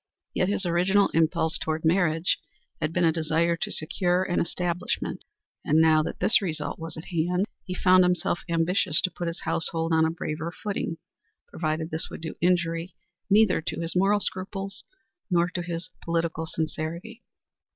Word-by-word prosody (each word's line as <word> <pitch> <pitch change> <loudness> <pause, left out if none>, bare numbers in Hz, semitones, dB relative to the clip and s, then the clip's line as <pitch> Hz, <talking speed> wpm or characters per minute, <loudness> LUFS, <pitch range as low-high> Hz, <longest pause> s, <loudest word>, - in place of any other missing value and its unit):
Yet 185 - +1
his 200 -1 0
original 180 +4 +3
impulse 165 0 +2
toward 160 0 -2
marriage 165 -1 +2 0.4
had 155 0 0
been 175 +1 +2
a 165 - +5
desire 165 +1 +1
to - - -3
secure 180 +3 +1
an 175 -2 0
establishment, 175 0 -2 0.4
and 155 - +3
now 160 -1 +5
that 155 - -5
this 235 0 +4
result 160 -6 -3
was 165 0 -6
at 160 - -8
hand 180 +2 +1 0.2
he 185 - -4
found 185 0 +5
himself 180 -1 +1
ambitious 165 -1 +2
to 185 -1 0
put 175 - -4
his 170 - -4
household 165 0 +1
on 160 0 +4
a 160 - +3
braver 160 0 -4
footing, 195 -4 -4 0.5
provided 160 0 -2
this 160 +1 -2
would - - -8
do 160 - -4
injury 170 -1 +1 0.3
neither 205 -3 +4
to 160 - -4
his 165 +1 -3
moral 195 +3 +3
scruples 195 +1 -4 0.5
nor 175 -1 +2
to 180 0 -3
his 170 0 -5
political 165 -1 -1
sincerity. 165 +8 -4
170 Hz, 165 wpm, -26 LUFS, 160-180 Hz, 0.5 s, a